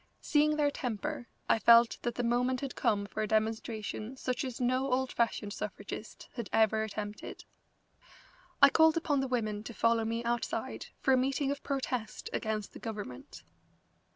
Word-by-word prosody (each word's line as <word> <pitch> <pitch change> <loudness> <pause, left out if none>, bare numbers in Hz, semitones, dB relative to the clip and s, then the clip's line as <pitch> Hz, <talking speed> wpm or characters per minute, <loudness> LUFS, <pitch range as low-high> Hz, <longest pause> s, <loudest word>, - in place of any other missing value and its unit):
Seeing 300 0 +3
their 295 -1 +2
temper, 255 +2 -4 0.2
I - - +3
felt 235 +1 +6
that 240 -1 -2
the 245 - -1
moment 245 +2 +1
had 275 -2 -4
come 205 -2 +1
for 215 - -4
a 215 - 0
demonstration 220 +2 -2
such 255 +2 -2
as 255 -3 -5
no 255 +2 +1
old 260 +1 +1
fashioned 220 -3 -1
suffragist 210 +1 -7
had 235 -5 -5
ever 220 0 +3
attempted. 210 -1 -6 1.2
I 280 - +11
called 320 0 +5
upon 295 -4 +1
the 270 - 0
women 215 -5 -1
to 230 0 -8
follow 230 0 +3
me 230 +1 -2
outside 235 0 -2
for 265 - +4
a - - +5
meeting 270 +2 +1
of 285 - -4
protest 255 -5 -3
against 215 -2 -2
the - - -9
government. 205 - -7
235 Hz, 165 wpm, -31 LUFS, 220-265 Hz, 1.2 s, I